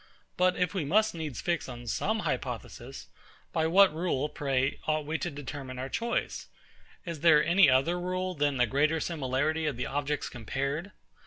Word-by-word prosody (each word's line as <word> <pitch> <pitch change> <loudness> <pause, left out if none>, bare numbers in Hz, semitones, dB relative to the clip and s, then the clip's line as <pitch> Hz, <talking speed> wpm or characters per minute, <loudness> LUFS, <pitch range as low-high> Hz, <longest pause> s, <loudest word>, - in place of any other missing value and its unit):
But 180 0 +3
if 180 0 0
we 190 -5 -1
must 215 +9 +3
needs 155 -6 -5
fix 170 -3 -1
on 120 0 -8
some 215 - -1
hypothesis; - - -5 0.5
by 160 -1 +2
what 190 +1 +6
rule, 155 -4 -1
pray, 135 -2 -1
ought 155 -1 +1
we 155 +2 -2
to 175 - -2
determine 140 -3 -7
our 130 +1 -4
choice? 235 - -2 0.6
Is 170 -3 -5
there 155 -1 +6
any 180 -2 +6
other 135 +7 +3
rule 185 +1 -2
than 145 -3 0
the 125 - +4
greater 150 +6 +2
similarity 155 0 -1
of 140 -5 -2
the 125 - -2
objects 145 +1 -2
compared? 140 - -3
155 Hz, 170 wpm, -29 LUFS, 135-175 Hz, 0.6 s, what